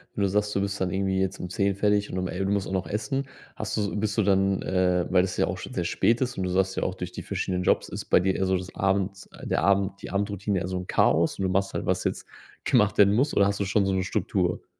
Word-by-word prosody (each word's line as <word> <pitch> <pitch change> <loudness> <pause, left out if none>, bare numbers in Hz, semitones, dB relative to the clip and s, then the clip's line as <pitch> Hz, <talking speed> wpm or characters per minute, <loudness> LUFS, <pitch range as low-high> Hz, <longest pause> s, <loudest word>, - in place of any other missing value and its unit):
Wenn 100 - 0
du 95 - +2
sagst, 105 +1 0
du 100 - +1
bist 100 0 -2
dann 90 - 0
irgendwie 95 -1 0
jetzt 95 0 -1
um 90 - -5
10:00 100 0 0
fertig 105 0 +1
und 95 - -4
um 90 0 -1
el 95 +2 -3
du 100 - 0
musst 100 -1 0
auch - - -6
noch 95 -1 -1
essen, 120 +6 -2 0.3
hast - - -4
du 100 -3 -1
bist 105 +1 -1
du 110 - +3
dann, 95 0 +2
äh, 90 -1 +1
weil 90 -1 +4
das 90 -1 -3
ja - - +3
auch - - -3
schon - - -8
sehr - - -1
spät 115 +3 +1
ist 125 -3 -1
und 95 - -1
du 90 - -1
sagst 95 +1 +1
ja - - 0
auch, 95 - -2
durch 90 -1 -6
die - - -7
verschiedenen 90 -2 -2
Jobs - - +2
ist - - -6
bei - - +4
dir 95 +1 +1
eher 95 - 0
so 95 0 +2
das 90 +1 -8
Abends 95 0 -1
der - - 0
Abend 100 0 +1
die - - -7
Abendroutine 100 -1 -1
eher 90 - -3
so 95 0 -3
'n 90 - -6
Chaos 80 +4 +2
und 95 - -2
du 95 - +1
machst 95 +1 0
halt, - - -3
was - - 0
jetzt - - -2 0.4
gemacht 105 -1 +3
werden 100 0 +6
muss, 135 +7 +2
oder 100 - +5
hast 100 0 0
du 100 - 0
schon 100 +1 +2
so 95 - 0
'ne 95 - 0
Struktur? 90 -2 -1
95 Hz, 295 wpm, -26 LUFS, 95-100 Hz, 0.4 s, werden